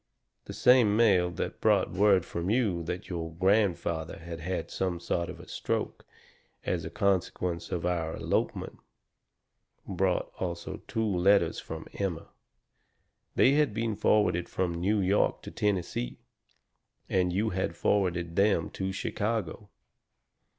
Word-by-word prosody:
"The - - -7
same 120 -5 +5
mail 95 -6 +4
that - - -4
brought - - +3
word 95 -1 +4
from 85 +2 -3
you 105 -7 +1
that 90 +3 -4
your 80 -2 -5
grandfather 90 -4 +1
had 85 0 -8
had 90 +3 -4
some 90 -2 -2
sort 85 0 -2
of 90 - -8
a - - -12
stroke, - - -3 0.6
as - - -1
a - - -5
consequence 90 -2 -1
of 85 -1 -2
our 85 -2 -1
elopement, - - -2 1.1
brought 95 -1 0
also 85 -2 -4
two 110 0 -1
letters 100 0 +3
from 80 0 -7
Emma. 90 -5 -3 1.1
They 130 - +5
had 145 -6 +2
been 115 -1 -1
forwarded 100 -4 +2
from 90 -2 -1
New 100 +5 +1
York 95 +2 +1
to - - -8
Tennessee, 90 -12 -1 0.9
and 90 -1 +1
you 105 +5 0
had 95 +1 -2
forwarded 85 -4 0
them 100 -4 +2
to 95 0 -3
Chicago. 105 0 -3
95 Hz, 135 wpm, -29 LUFS, 85-105 Hz, 1.1 s, same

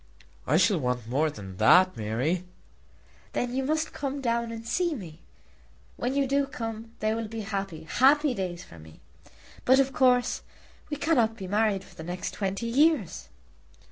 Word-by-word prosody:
"I 150 - +4
shall 190 0 +3
want 125 -4 -2
more 145 +6 +1
than 95 -8 -9
that, 180 - +6
Mary." 120 +11 -1 0.9
"Then 245 0 -1
you 265 - 0
must 315 +3 -1
come 280 -1 -3
down 235 -2 -1
and 230 0 -7
see 345 +5 0
me. 170 - -9 0.8
When 250 +3 -2
you 280 -1 +2
do 275 +1 +1
come 225 -3 -6
they 215 0 +1
will 225 0 -3
be 225 +1 -5
happy, 195 -5 -4
happy 275 - +4
days 180 -4 -4
for 85 - -14
me. 80 0 -15 0.6
But 260 +1 +5
of 270 0 +2
course 250 -2 +3 0.5
we 295 - -3
cannot 240 -8 +2
be 190 - -6
married 205 -1 +1
for - - -17
the 160 - -9
next 175 +2 -4
twenty 195 +3 -2
years." 270 - +2
220 Hz, 170 wpm, -27 LUFS, 175-260 Hz, 0.9 s, that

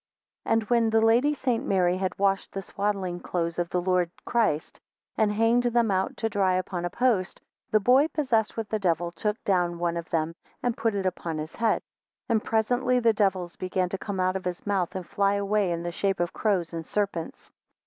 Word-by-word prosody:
15 - - -3
And 225 -1 0
when 230 -2 +4
the 225 0 +3
Lady 230 +6 +4
St. 255 -4 -1
Mary 185 -8 +2
had 185 0 -2
washed 195 0 0
the 195 - -3
swaddling 195 -2 -2
clothes 170 -1 -2
of 175 -1 -1
the 180 - 0
Lord 180 -1 +1 0.2
Christ, 215 -10 0 0.4
and 215 -1 +2
hanged 225 +3 +3
them 235 -2 +2
out 190 0 0
to 225 - 0
dry 195 -4 +1
upon 180 -1 -2
a - - -1
post, 210 -3 0 0.3
the 215 - +4
boy 255 +8 +5
possessed 245 -10 0
with 225 -2 -2
the 215 - -1
devil 175 -2 0
took 210 +4 -2
down 175 -3 +1
one 170 0 -1
of 170 - -6
them, 160 0 0 0.3
and 245 -2 0
put 225 -2 0
it 195 -1 -2
upon 170 -3 -2
his 155 +1 -5
head. 225 -1 +1 0.4
16 - - -67
And 225 -2 +2
presently 245 +3 +1
the 230 -2 +3
devils 190 -4 0
began 185 0 -1
to 195 - -3
come 200 -2 -4
out 185 0 +1
of 190 - -4
his 180 -1 -4
mouth, 195 -2 0
and 185 -2 -4
fly 200 +2 +1
away 200 -1 +1
in 170 0 -2
the 175 - -3
shape 195 +2 -1
of 175 0 -1
crows 185 -6 0
and 165 -1 -4
serpents. 195 -2 -3
195 Hz, 215 wpm, -26 LUFS, 175-225 Hz, 0.4 s, boy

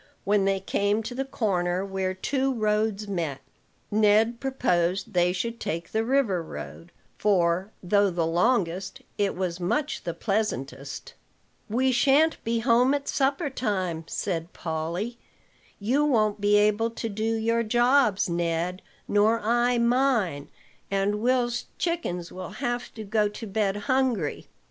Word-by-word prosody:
When 205 -1 +2
they 195 0 +1
came 205 +3 0
to 235 - -5
the 265 +2 -2
corner 185 -7 -1
where 190 -1 -2
two 270 +7 0
roads 210 -1 0
met, 165 -8 -2 0.5
Ned 215 +2 +3
proposed 195 -7 0
they 175 0 +3
should 230 +6 -3
take 165 +1 -4
the 220 0 +1
river 235 -8 +1
road; 165 +1 -9 0.3
for, 185 -1 +2
though 200 +2 +3
the 170 -2 -1
longest, 185 +1 0 0.2
it 200 -1 +1
was 180 -1 -2
much 290 - -1
the 170 - -4
pleasantest. 140 - -3 0.6
"We 260 +4 +2
shan't 280 +6 +3
be 230 0 0
home 250 +3 +4
at 280 -1 -4
supper 275 +2 0
time," 185 -10 -2
said 170 -3 -3
Polly. 170 +8 -4 0.6
"You 250 +8 +1
won't 215 -7 +2
be 205 0 +4
able 210 +2 +3
to 230 0 -5
do 220 +2 -1
your 230 +1 +1
jobs, 240 -2 +3
Ned, 170 +1 -1 0.3
nor 215 +3 +3
I 240 +2 +2
mine, 235 - +1 0.4
and 200 +1 0
Will's 245 0 +1
chickens 300 - -2
will 185 -1 -7
have 240 0 -2
to 220 - -6
go 210 0 +1
to 210 +2 -8
bed 200 -1 0
hungry." 255 - 0
210 Hz, 140 wpm, -26 LUFS, 180-240 Hz, 0.6 s, home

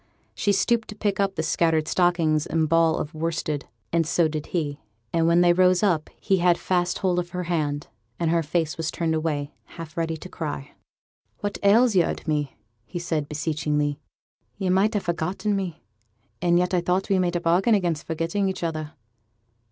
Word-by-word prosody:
She 205 - +1
stooped 225 +4 +1
to 210 - -8
pick 205 -2 -1
up 195 -1 +1
the 160 - -1
scattered 160 -2 +1
stockings 170 -4 +2
and 160 0 +1
ball 165 0 +3
of 150 - -4
worsted, 160 -2 -2 0.3
and 165 -2 +2
so 165 0 +3
did 155 -1 -4
he; 150 -5 -2 0.3
and 165 -1 +2
when 170 +1 +5
they 175 0 +5
rose 185 +1 +4
up, 170 -7 +1
he 195 - +2
had 175 -1 +3
fast 175 -1 0
hold 180 -2 +1
of 175 -1 -4
her 180 0 -4
hand, 150 -4 -1 0.3
and 165 -1 +1
her 170 0 +3
face 160 0 -1
was 160 -1 -2
turned 165 -2 -1
away, 150 -2 -2 0.2
half 165 -2 -8
ready 165 -1 -1
to 160 - -9
cry. 150 -5 -5 0.7
'What 205 -1 -3
ails 220 +3 +5
yo' 175 -3 +5
at - - -5
me?' 150 -3 -1 0.4
said 165 -4 -1
he, - - -24
beseechingly. 150 -1 -1 0.6
'Yo' 190 -3 0
might 205 +4 +3
ha' 205 - 0
forgotten 180 +5 -1
me; 185 -5 -4 0.6
and 175 -1 +3
yet 180 +1 +1
I 180 - +3
thought 180 +2 0
we 195 -1 +3
made 175 -1 0
a - - +2
bargain 180 +7 +3
against 170 -6 -1
forgetting 165 +5 -1
each 190 - -5
other.' 155 -2 -3
170 Hz, 190 wpm, -25 LUFS, 155-185 Hz, 0.7 s, when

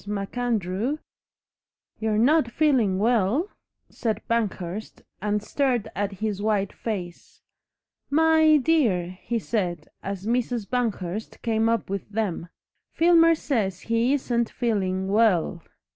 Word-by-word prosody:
MacAndrew 210 - -2 0.5
" - - -54
"You're 220 -1 0
not 260 +3 +4
feeling 240 -9 +2
WELL?" 230 - +2 0.4
said 220 -3 -3
Banghurst, 210 -3 -3 0.2
and 210 0 -1
stared 250 -2 0
at 200 +1 -2
his 205 0 -3
white 205 -2 0
face. 180 -6 -6 0.7
"My 315 +1 +5
dear!" 220 - +1
he 235 - -2
said, 180 -8 -2
as 195 0 -5
Mrs. 235 -2 -1
Banghurst 220 -5 -3
came 225 -1 +1
up 230 -2 0
with 195 +1 -4
them, 200 -5 -2 0.4
"Filmer 330 0 +5
says 210 - -1
he 230 +3 +1
isn't 240 -4 0
feeling 190 -5 -1
WELL." 195 -5 +2
220 Hz, 115 wpm, -25 LUFS, 195-245 Hz, 0.7 s, My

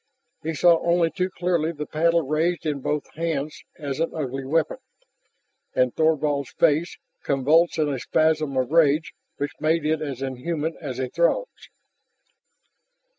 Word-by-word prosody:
He 160 +1 -3
saw 170 +2 +5
only 170 -1 +2
too 185 0 -1
clearly 175 -3 0
the 150 -2 -6
paddle 165 +2 +2
raised 160 +5 0
in 150 -2 -1
both 150 +2 -3
hands 155 -2 -3 0.2
as 145 -2 -4
an 165 - 0
ugly 135 -3 -3
weapon, 155 - 0 1.0
and 125 -1 +2
Thorvald's 150 -3 +1
face, 165 +1 +2 0.3
convulsed 150 +6 +3
in 155 -1 +2
a 140 -3 -2
spasm 155 +2 +1
of 130 +1 0
rage 155 -1 +3 0.2
which 145 0 -2
made 155 0 +1
it 155 0 +1
as 135 -4 -4
inhuman 150 +5 -3
as 135 -6 -5
a 130 -1 -1
Throg's. 170 - -1
155 Hz, 145 wpm, -24 LUFS, 140-165 Hz, 1.0 s, saw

